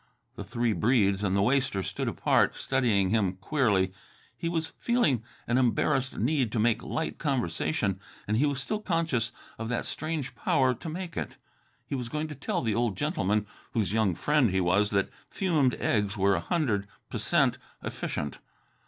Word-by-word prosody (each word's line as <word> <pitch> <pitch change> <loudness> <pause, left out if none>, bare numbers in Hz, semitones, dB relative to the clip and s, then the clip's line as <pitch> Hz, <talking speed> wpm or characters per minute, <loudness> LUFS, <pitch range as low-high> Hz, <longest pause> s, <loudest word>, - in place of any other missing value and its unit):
The - - -6
three 120 -2 0
Breedes 105 -4 +3
and 95 -1 +1
the 100 - +3
waster 125 -5 +1
stood - - -3
apart, - - +2
studying 110 -8 +1
him 105 -5 +2
queerly. 95 -3 +1 0.4
He 165 - -3
was 160 -1 -2
feeling 235 - +2 0.2
an 120 +2 +2
embarrassed 130 +1 +1
need 130 0 +1
to 115 - +1
make 115 +1 +2
light 160 - -3
conversation, 115 - 0 0.3
and 105 - +1
he 140 +6 +3
was 140 -2 0
still 210 +11 -2
conscious 165 - 0 0.3
of 115 0 -3
that 125 - -1
strange 155 -3 -3
power 130 -2 +2
to 160 - -7
make 175 +1 -5
it. - - -4 0.5
He - - -6
was 125 -3 -3
going 155 +2 -2
to 150 - -6
tell 175 - -2
the 110 -2 +1
old 115 -3 0
gentleman, 105 +3 0 0.3
whose 105 -4 0
young 110 -6 +2
friend 150 - +3
he 95 0 +1
was, 95 +4 +3
that 100 -1 +1 0.2
fumed 155 -10 +2
eggs 105 -1 0
were 100 0 +4
a 90 - +1
hundred 105 - 0 0.2
p'cent - - +2 0.2
efficient. 75 -2 -4
120 Hz, 170 wpm, -28 LUFS, 100-150 Hz, 0.5 s, were